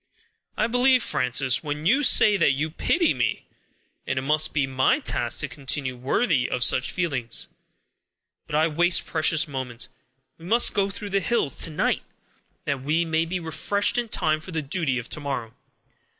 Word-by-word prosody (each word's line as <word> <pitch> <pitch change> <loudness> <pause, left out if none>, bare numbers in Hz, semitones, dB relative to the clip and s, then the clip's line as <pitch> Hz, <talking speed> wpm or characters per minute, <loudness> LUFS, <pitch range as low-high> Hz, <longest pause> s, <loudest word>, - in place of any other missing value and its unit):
I 215 - +2
believe 245 +3 +3
you, - - -2
Frances, 125 +1 +1
when 150 0 -5
you 260 +11 +4
say 215 -6 +5
that 145 -7 +3
you 150 +3 -2
pity 340 - +1
me, - - -2 0.6
and - - -2
it 130 - -1
must 155 +2 +1
be 145 -3 0
my 135 - +1
task 120 - +1
to 145 - -1
continue 135 -1 -3
worthy 135 - 0
of 125 - -1
such 130 +1 +2
feelings. 135 -10 -2 1.0
But - - -4
I 155 +1 +3
waste 175 +3 +2
the - - -15
precious 160 0 +2
moments; 130 -4 -4 0.5
we 165 - -13
must 230 +6 +3
go 200 -1 +1
through 205 +1 -7
the 195 - +2
hills 195 -8 0
to - - +1
night, 155 - 0 0.6
that 140 -2 -2
we 155 +5 0
may 160 0 0
be 180 +2 -3
refreshed 200 +7 0
in 240 -2 -4
time 155 -5 0
for 170 - -9
the 160 -3 -3
duty 140 -3 -1
of 125 0 -5
to - - -2
morrow. 135 -6 -5
155 Hz, 185 wpm, -24 LUFS, 135-185 Hz, 1.0 s, say